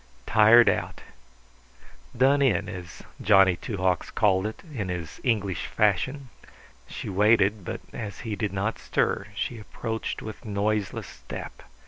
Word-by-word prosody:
Tired 110 +2 +6
out - - 0 1.2
done 135 +3 +4
in, 105 -8 +2
as 90 -4 -8 0.2
Johnny 95 -3 +5
Two 105 +4 -6
Hawks 90 -2 0
called 95 -1 +2
it 110 - -8
in 100 -8 -3
his 85 -4 -6
English 100 -7 0
fashion. 125 +7 0 0.6
She - - -7
waited; 105 0 +3
but - - -5
as 105 -4 -6
he 110 -3 -4
did 105 -1 -2
not 100 +3 -2
stir - - 0
she 120 - -3
approached 110 +1 -5
with 110 -1 -8
noiseless 105 -1 -1
step. - - -9
105 Hz, 135 wpm, -26 LUFS, 95-110 Hz, 1.2 s, Tired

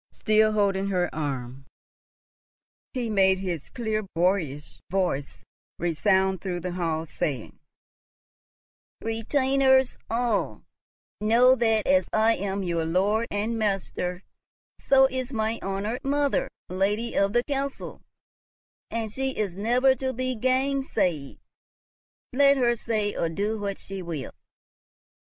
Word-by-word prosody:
Still 215 0 +2
holding 200 -2 +1
her 180 -3 0
arm, 135 -3 -4 1.2
he 250 -3 -2
made 190 -3 +3
his 180 -5 -4
clear 220 -3 -2
boyish 165 -5 -1
voice 175 -7 -2 0.3
resound 190 +2 +1
through 180 -2 -3
the 180 - -3
hall, 165 -3 -2
saying, 140 -6 -4 1.4
"Retainers 265 +3 +2
all, 230 -2 -1 0.6
know 235 +4 +5
that, 225 -4 +2
as 280 0 +3
I 220 +1 +4
am 195 0 -3
your 170 -2 -1
lord 200 +7 +1
and 220 +3 -2
master, 195 -3 -2 0.6
so 270 -1 +5
is 260 -1 -2
my 220 -1 -1
honoured 205 +7 -3
mother 285 0 +1 0.2
lady 205 +5 -1
of 200 +1 +2
the 240 0 +3
castle, 275 0 -4 0.9
and 225 -2 -3
she 265 +1 -2
is 200 -5 -2
never 245 +6 +3
to 260 -1 -2
be 255 +1 -2
gainsay'ed, 255 - 0 1.0
let 280 +1 +5
her 240 -2 +3
say 215 -3 -1
or 165 - 0
do 205 +6 -2
what 200 -1 -3
she 195 -1 -7
will." 165 -6 -5
210 Hz, 120 wpm, -26 LUFS, 185-245 Hz, 1.4 s, know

